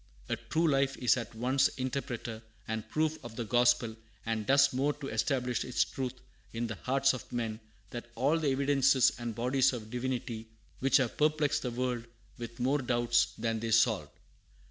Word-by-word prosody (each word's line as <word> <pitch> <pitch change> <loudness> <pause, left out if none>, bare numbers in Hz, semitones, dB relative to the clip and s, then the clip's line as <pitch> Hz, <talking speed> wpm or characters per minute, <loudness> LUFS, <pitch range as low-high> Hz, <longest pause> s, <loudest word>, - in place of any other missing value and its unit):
A - - +1
true 165 +1 0
life 135 -2 +2
is 125 - +3
at 120 -2 -6
once 130 +4 +3
interpreter 130 -4 -4 0.3
and 110 -1 -4
proof 155 0 -1
of 120 -1 -9
the 120 - -3
gospel, 120 0 +3 0.3
and 110 -2 -2
does 140 0 +5
more 140 +3 +1
to 140 -1 -7
establish 125 +2 0
its 125 - +1
truth 130 -1 -4 0.4
in 115 +1 -2
the 110 - -3
hearts 135 +5 +1
of 130 - -8
men 115 -3 -2 0.3
than 120 - -5
all 140 +7 +2
the 155 - -1
"Evidences" 135 -1 +4
and 120 -2 -4
"Bodies 130 +3 +2
of 110 -3 -7
Divinity" 125 -2 -3 0.3
which 135 +1 +4
have 130 -4 -1
perplexed 150 -1 +2
the 125 - -2
world 120 -1 -2 0.3
with 115 0 -7
more 135 +4 +2
doubts 120 -2 +2
than 115 0 -1
they 115 +1 -3
solved. 110 - +3
125 Hz, 175 wpm, -31 LUFS, 115-135 Hz, 0.4 s, does